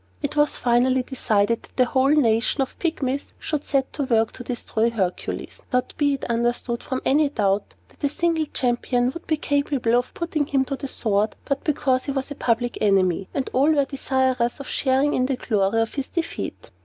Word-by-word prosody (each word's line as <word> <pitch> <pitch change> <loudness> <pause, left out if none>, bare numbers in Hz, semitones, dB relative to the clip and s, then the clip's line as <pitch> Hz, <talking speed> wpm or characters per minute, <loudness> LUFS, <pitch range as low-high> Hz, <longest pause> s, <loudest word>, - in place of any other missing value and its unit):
It - - -2
was 295 0 +2
finally 250 +1 +2
decided 230 -4 +1
that - - -19
the 255 - +5
whole 260 +2 +2
nation 250 -2 +3
of 265 - -8
Pygmies 280 -5 -2
should 305 -2 -3
set 270 -2 0
to 290 - -2
work 225 -3 +2
to 250 - -9
destroy 235 -2 -1
Hercules; 190 -6 -3
not, 250 -1 0
be 285 -1 +3
it 270 - -6
understood, 235 0 -1
from 260 - -4
any 290 +2 +3
doubt 205 -6 0
that - - -23
a 285 - +3
single 325 0 0
champion 245 -1 0
would 335 +5 -10
be 315 - +1
capable 285 -5 +1
of 245 +1 0
putting 320 -4 -1
him 270 -2 +1
to 275 - -3
the 275 - -6
sword, 215 -4 0
but 275 -1 -1
because 270 -4 +1
he 280 - -2
was 270 +1 -3
a - - -4
public 240 -1 0
enemy, 190 -3 +2
and 270 - -2
all 275 +4 +4
were 285 -3 +3
desirous 260 -3 0
of 275 - -7
sharing 270 +2 +1
in 255 0 +1
the 270 - 0
glory 210 -2 +1
of 225 0 0
his 275 -2 -3
defeat. 335 -1 -4
260 Hz, 200 wpm, -23 LUFS, 235-285 Hz, -, the